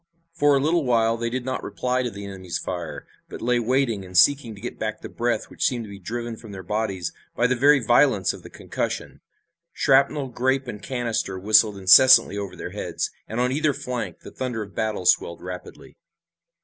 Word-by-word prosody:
For 145 -3 +3
a - - +3
little 160 +4 +1
while 115 -3 +2
they 115 0 -2
did 125 +1 -4
not 130 0 -3
reply 125 +5 -1
to 125 - -2
the 100 -2 -8
enemy's 95 -3 -5
fire, 85 -3 -6 0.2
but - - -8
lay 120 +1 +1
waiting 120 -3 0
and 90 0 -4
seeking 125 0 +4
to - - -13
get 120 +4 -7
back 110 0 -3
the - - -8
breath 120 -2 -1
which - - -5
seemed 120 -2 +1
to 105 - -11
be 100 - -10
driven 115 +3 -5
from 110 -2 -12
their 95 -1 -8
bodies 100 -4 -2 0.2
by 120 - +1
the 125 +1 +2
very 140 +3 +5
violence 120 -4 +3
of - - -11
the - - -12
concussion. - - -5 0.5
Shrapnel, 135 0 +2
grape 130 +2 0
and 105 -3 -7
canister 115 -5 -2
whistled 105 +1 +4
incessantly 100 +4 +7
over 100 -2 -5
their - - -7
heads, - - -3 0.2
and 110 - -4
on 125 +1 +1
either 150 +1 +1
flank 125 -2 -5
the - - -11
thunder 125 -4 -4
of 100 - -12
the - - -27
battle 110 -4 -2
swelled 85 - +2
rapidly. 90 0 -9
115 Hz, 205 wpm, -24 LUFS, 100-130 Hz, 0.5 s, incessantly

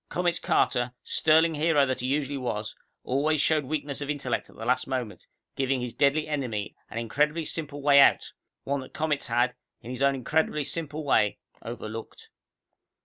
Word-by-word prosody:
Comets 175 -1 0
Carter, 120 0 +1
sterling 160 +1 +3
hero 150 -2 +3
that 130 -1 -2
he 125 - -2
usually 140 +1 0
was, 110 -4 -3 0.3
always 145 +4 +1
showed 150 -1 +2
weakness 145 0 -3
of 145 - -4
intellect 140 -5 -2
at - - -17
the 115 - -7
last 125 +1 +1
moment, 125 -8 -4 0.3
giving 135 -1 0
his 125 -1 -4
deadly 145 +2 +2
enemy 125 -9 -3
an - - -7
incredibly 150 +8 0
simple 145 -3 -5
way 140 -1 +7
out, 140 - +5 0.3
one 140 +1 -1
that 130 - -10
Comets 155 -2 0
had, 120 +2 +2 0.3
in 120 - -9
his 125 +1 -5
own 140 0 +4
incredibly 150 +3 0
simple 155 0 -4
way, 105 -7 +3 0.2
overlooked. 115 -1 -8
140 Hz, 170 wpm, -27 LUFS, 125-150 Hz, 0.3 s, way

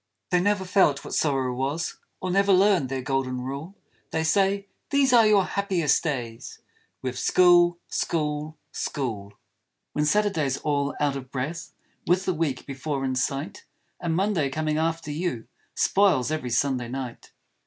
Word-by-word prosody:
They 180 - +4
never 205 0 +1
felt 180 -7 +2
what - - -7
Sorrow 135 -4 +1
was; 140 +6 -3 0.2
Or 185 - -1
never 200 +2 +3
learned 190 -7 +4
their 130 -1 -3
Golden 130 -1 -1
Rule; 140 +9 -6 0.3
They 160 - -1
say, 195 +4 +2 0.2
These 275 -2 +3
are 230 -3 +7
your 205 -3 +4
happiest 180 -8 +1
days, 120 -7 -4 0.5
With 130 -1 -3
School, 175 -1 +5
School, 150 -1 -2
School! 110 -8 -4 0.6
When 150 - +1
Saturday's 160 -7 +1
all 145 -1 -1
out 145 -2 +1
of 130 -2 -7
breath 150 +6 -4 0.3
With 180 +2 +2
all 185 - +2
the 160 - -8
week 145 -6 -1
before 140 0 -3
in 130 - -1
sight; 140 +9 -3 0.3
And 165 -2 -1
Monday 185 -6 +1
coming 155 +2 -1
after 165 -1 -1
you 150 -7 -3 0.3
Spoils 185 -9 +3
every 155 -5 -2
Sunday 125 0 0
night! 125 -1 -6
155 Hz, 155 wpm, -25 LUFS, 135-185 Hz, 0.6 s, are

